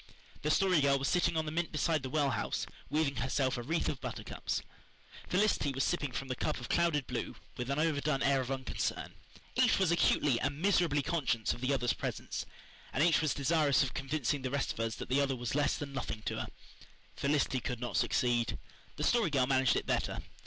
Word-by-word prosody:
The 150 Hz, -, -1 dB
Story 180 Hz, 0 st, +4 dB
Girl 140 Hz, 0 st, +4 dB
was 135 Hz, 0 st, -1 dB
sitting 170 Hz, -2 st, +2 dB
on 160 Hz, -, 0 dB
the 150 Hz, -, -3 dB
mint 170 Hz, +1 st, -1 dB
beside 155 Hz, 0 st, +1 dB
the 130 Hz, -, -5 dB
well 145 Hz, -1 st, +1 dB
house, -, -, -2 dB, 0.2 s
weaving 145 Hz, -1 st, 0 dB
herself 130 Hz, 0 st, 0 dB
a 120 Hz, -, -3 dB
wreath 160 Hz, +7 st, -1 dB
of 135 Hz, -, -3 dB
buttercups. -, -, -4 dB, 0.7 s
Felicity 185 Hz, -6 st, +2 dB
was 135 Hz, +1 st, 0 dB
sipping 145 Hz, -6 st, 0 dB
from 135 Hz, +2 st, -4 dB
the 130 Hz, -, -2 dB
cup -, -, -2 dB
of 120 Hz, -, -7 dB
clouded 150 Hz, -5 st, +2 dB
blue -, -, -4 dB, 0.2 s
with 125 Hz, +1 st, -4 dB
an 140 Hz, -, 0 dB
overdone 150 Hz, -3 st, +1 dB
air 140 Hz, -1 st, +3 dB
of 130 Hz, -, -5 dB
unconcern. 135 Hz, -1 st, -3 dB, 0.4 s
Each -, -, +4 dB
was 190 Hz, -3 st, +2 dB
acutely 145 Hz, -6 st, +3 dB
and 140 Hz, +1 st, -2 dB
miserably 175 Hz, -6 st, +2 dB
conscious 130 Hz, -8 st, 0 dB
of 120 Hz, -, -9 dB
the 130 Hz, +2 st, +1 dB
other's 125 Hz, -3 st, +1 dB
presence, -, -, -4 dB, 0.4 s
and 140 Hz, -, +2 dB
each 165 Hz, -1 st, +4 dB
was 155 Hz, -5 st, +1 dB
desirous 145 Hz, 0 st, +3 dB
of 130 Hz, -, -3 dB
convincing 140 Hz, 0 st, -1 dB
the 130 Hz, -, -2 dB
rest 140 Hz, +1 st, -1 dB
of -, -, -12 dB
us 115 Hz, 0 st, -1 dB
that -, -, -6 dB
the 135 Hz, +3 st, +2 dB
other 135 Hz, -1 st, +1 dB
was 120 Hz, -1 st, -3 dB
less 145 Hz, +1 st, +2 dB
than 145 Hz, -3 st, -6 dB
nothing 110 Hz, -5 st, -4 dB
to -, -, -2 dB
her. -, -, -3 dB, 0.7 s
Felicity 140 Hz, -2 st, +1 dB
could 125 Hz, 0 st, -4 dB
not 120 Hz, -1 st, -4 dB
succeed. 120 Hz, -2 st, +1 dB, 0.4 s
The -, -, -3 dB
Story 235 Hz, -7 st, +3 dB
Girl 135 Hz, -4 st, +2 dB
managed 130 Hz, -1 st, +3 dB
it -, -, -1 dB
better. -, -, -1 dB
140 Hz, 210 wpm, -32 LUFS, 130-155 Hz, 0.7 s, Story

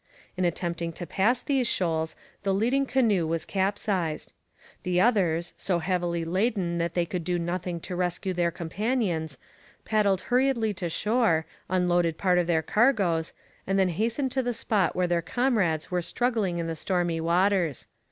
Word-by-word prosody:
In 185 Hz, -1 st, 0 dB
attempting 170 Hz, -1 st, -2 dB
to 175 Hz, -, -6 dB
pass 220 Hz, +9 st, +1 dB
these 265 Hz, -4 st, +1 dB
shoals 160 Hz, -5 st, 0 dB, 0.3 s
the 195 Hz, -1 st, 0 dB
leading 255 Hz, +7 st, +1 dB
canoe 215 Hz, -12 st, +2 dB
was 165 Hz, 0 st, -1 dB
capsized. 190 Hz, -5 st, -1 dB, 0.5 s
The 180 Hz, -1 st, 0 dB
others, 175 Hz, -6 st, +2 dB
so 185 Hz, -3 st, 0 dB
heavily 170 Hz, -1 st, -1 dB
laden 185 Hz, -1 st, 0 dB
that 170 Hz, 0 st, -2 dB
they 175 Hz, -1 st, +2 dB
could 175 Hz, 0 st, -4 dB
do 175 Hz, +1 st, 0 dB
nothing 175 Hz, 0 st, -3 dB
to 180 Hz, -, -5 dB
rescue 180 Hz, +1 st, -1 dB
their 175 Hz, -1 st, +1 dB
companions, 170 Hz, -, -2 dB, 0.5 s
paddled 205 Hz, -3 st, +2 dB
hurriedly 245 Hz, -4 st, +1 dB
to 175 Hz, -2 st, -4 dB
shore, 210 Hz, -3 st, +1 dB, 0.2 s
unloaded 175 Hz, -3 st, +2 dB
part 180 Hz, -2 st, +3 dB
of 175 Hz, -, 0 dB
their 160 Hz, -2 st, +2 dB
cargoes, 195 Hz, -, +2 dB, 0.4 s
and 195 Hz, +1 st, +1 dB
then 190 Hz, -1 st, +3 dB
hastened 230 Hz, -, -1 dB
to 265 Hz, -, +1 dB
the 245 Hz, -2 st, -2 dB
spot 215 Hz, -3 st, 0 dB
where 180 Hz, -, +2 dB
their 175 Hz, -1 st, +1 dB
comrades 195 Hz, -, 0 dB
were 180 Hz, -1 st, +1 dB
struggling 220 Hz, -3 st, 0 dB
in 170 Hz, -, -2 dB
the 165 Hz, 0 st, -3 dB
stormy 175 Hz, -1 st, -1 dB
waters. 175 Hz, -2 st, +1 dB
180 Hz, 160 wpm, -27 LUFS, 170-210 Hz, 0.5 s, part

